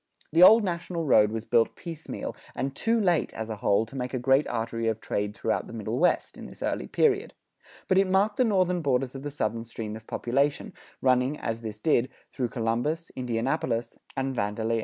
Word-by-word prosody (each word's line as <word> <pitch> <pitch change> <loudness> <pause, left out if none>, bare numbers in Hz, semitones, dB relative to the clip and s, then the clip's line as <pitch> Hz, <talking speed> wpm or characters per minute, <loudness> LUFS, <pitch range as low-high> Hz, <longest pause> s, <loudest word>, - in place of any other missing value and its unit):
The 165 +3 +3
Old 220 +5 +9
National 170 -2 -3
road 105 -6 +5
was 110 0 -4
built 115 -1 +2
piecemeal, 165 -2 -6 0.2
and 135 +1 -3
too 230 +7 +1
late, 175 -6 +2
as 110 0 -4
a 110 - -4
whole, 100 +2 +2
to 115 - -13
make 125 0 -3
a - - +1
great 135 +3 +3
artery 115 0 -2
of 110 -1 0
trade 105 0 -2
throughout - - -1
the - - -10
Middle 110 +1 -3
West, 180 - +1
in - - -8
this - - -10
early - - -2
period; 415 -1 +1 0.5
but 190 0 +4
it 195 -1 +2
marked 200 +3 +2
the 255 - +4
northern 185 -5 +2
borders 135 -3 0
of 135 - -7
the 145 - -4
Southern 115 -5 -2
stream 115 -2 -6
of 110 0 -11
population, 140 +4 0 0.3
running, 130 +2 +3
as 115 0 -3
this 110 -2 -6
did, 125 0 +2 0.2
through 125 -2 -2
Columbus, 125 +7 -1
Indianapolis, 120 -1 -2 0.2
and 135 0 -1
Vandalia. 110 +2 -1
130 Hz, 200 wpm, -27 LUFS, 115-165 Hz, 0.5 s, Old